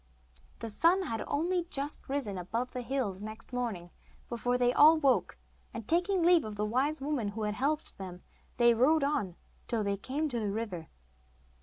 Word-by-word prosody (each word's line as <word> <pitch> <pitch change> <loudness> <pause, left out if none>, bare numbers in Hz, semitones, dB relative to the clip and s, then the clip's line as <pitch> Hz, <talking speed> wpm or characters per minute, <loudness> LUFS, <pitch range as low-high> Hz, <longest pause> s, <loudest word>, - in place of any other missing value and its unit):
The 230 - -6
sun 345 - +3
had 225 -9 -3
only 345 +3 0
just 280 0 -3
risen 270 -8 -1
above 230 +8 -3
the 250 - -4
hills 235 -7 -2
next 215 +3 -9
morning 215 -9 -3 0.4
before 245 +1 0
they 245 0 +3
all 310 +4 +7
woke, 275 -4 +2 0.4
and, 225 -2 -6
taking 355 +2 +2
leave 345 -1 +5
of 215 -1 -6
the 210 +1 -1
wise 270 +8 0
woman 275 -6 -1
who 215 +2 -4
had 210 0 -1
helped 285 +2 -2
them, 180 -2 -8 0.3
they 240 -1 +6
rode 280 +6 +4
on 210 - 0 0.3
till 225 -3 0
they 200 0 -1
came 280 +9 -2
to 240 -3 -2
the 210 -2 -1
river. 200 -7 -4
245 Hz, 180 wpm, -31 LUFS, 210-295 Hz, 0.4 s, all